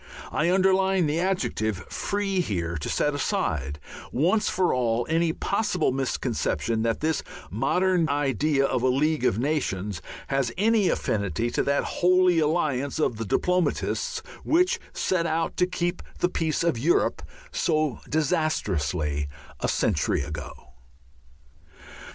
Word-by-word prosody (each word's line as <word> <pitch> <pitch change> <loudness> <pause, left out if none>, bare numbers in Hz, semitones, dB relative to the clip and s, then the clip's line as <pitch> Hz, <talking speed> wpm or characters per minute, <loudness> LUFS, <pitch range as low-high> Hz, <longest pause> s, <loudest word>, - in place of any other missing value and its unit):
I 165 +3 +1
underline 190 0 +3
the 150 +2 0
adjective 110 - -1
"Free" 200 -2 -1
here 85 - -1
to 75 - -4
set 150 - +1
aside, 80 - -1 0.3
once 180 - +2
for 185 -1 +1
all, 120 -2 +1
any 165 0 +2
possible 185 -3 0
misconception 125 -3 -1
that 115 0 0
this 160 0 +1 0.3
modern 170 - +2
idea 145 0 +1
of 130 -3 0
a 130 - +2
League 145 +2 +1
of 110 - +2
Nations 105 - -1 0.3
has 135 -3 +1
any 215 -1 +3
affinity 100 +2 -1
to - - +1
that 140 0 +1
Holy 180 -1 +3
Alliance 150 -4 0
of 125 -7 0
the 115 - -3
diplomatists, 180 - 0 0.2
which 360 +3 +2
set 170 -3 0
out 165 +1 -1
to 180 - +3
keep 175 -1 -2 0.2
the 175 - +1
peace 160 -3 -1
of 170 -9 +1
Europe 160 +8 +2 0.3
so 155 -6 0
disastrously 90 - 0 0.3
a - - -1
century - - +1
ago. 75 0 -6
150 Hz, 130 wpm, -26 LUFS, 115-180 Hz, 0.3 s, underline